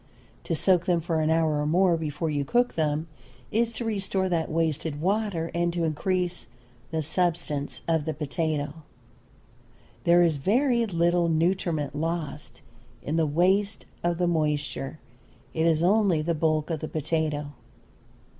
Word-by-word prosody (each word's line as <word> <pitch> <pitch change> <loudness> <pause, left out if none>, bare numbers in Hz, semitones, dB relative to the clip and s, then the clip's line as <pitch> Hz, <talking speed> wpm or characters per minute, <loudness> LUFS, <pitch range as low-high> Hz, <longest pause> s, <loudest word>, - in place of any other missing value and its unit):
To - - 0
soak 180 -3 +2
them 175 -2 +3
for 165 -1 -1
an 155 - +1
hour 160 -2 +2
or 150 - -1
more 175 +2 +4
before 160 0 -2
you 145 -1 0
cook 245 - +1
them 155 0 0 0.4
is 230 +1 +1
to 230 +1 -4
restore 195 -3 -1
that 165 -2 0
wasted 160 -2 -1
water 190 -2 0
and 170 0 +1
to 170 -1 -1
increase 175 +1 -1 0.4
the 160 -1 -1
substance 160 -3 0
of 160 -3 +1
the 160 - -1
potato. 150 0 -2 1.2
There 175 +1 +5
is 165 -3 +2
very 235 - +2
little 170 -1 +2
nutriment 165 -3 0
lost 155 -2 -4 0.4
in 150 - -2
the 165 -1 +2
waste 190 +7 +1 0.2
of 175 -1 +1
the 180 - +1
moisture; 150 -3 -1 0.6
it 160 +1 +1
is 160 0 +2
only 190 -4 +3
the 170 +2 0
bulk 155 0 0
of 160 - -1
the 155 - -5
potato. 155 -2 -1
165 Hz, 150 wpm, -26 LUFS, 155-180 Hz, 1.2 s, There